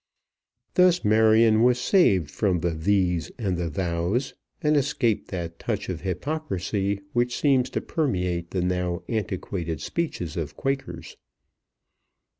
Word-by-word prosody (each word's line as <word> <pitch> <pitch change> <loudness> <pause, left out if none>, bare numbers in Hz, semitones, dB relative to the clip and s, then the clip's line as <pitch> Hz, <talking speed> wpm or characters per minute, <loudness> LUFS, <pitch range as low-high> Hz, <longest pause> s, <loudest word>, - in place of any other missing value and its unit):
Thus 180 -4 +4
Marion 110 +1 +5
was 125 +1 +4
saved 115 - +3
from 95 -5 0
the 85 - 0
"thees" 90 0 +1
and 100 -7 -1
the 85 -1 -2
"thous," 90 - -1 0.3
and 150 -2 +2
escaped 130 -5 0
that 85 -3 -5
touch 105 -4 -3
of 90 -3 -4
hypocrisy 100 - -2
which 120 0 0
seems 135 -4 +3
to - - -2
permeate 90 - -1
the 90 -2 -1
now 90 -1 -1
antiquated 95 - -3
speeches 90 - -3
of 75 -3 -4
Quakers. 135 0 -4
100 Hz, 125 wpm, -25 LUFS, 90-125 Hz, 0.3 s, Marion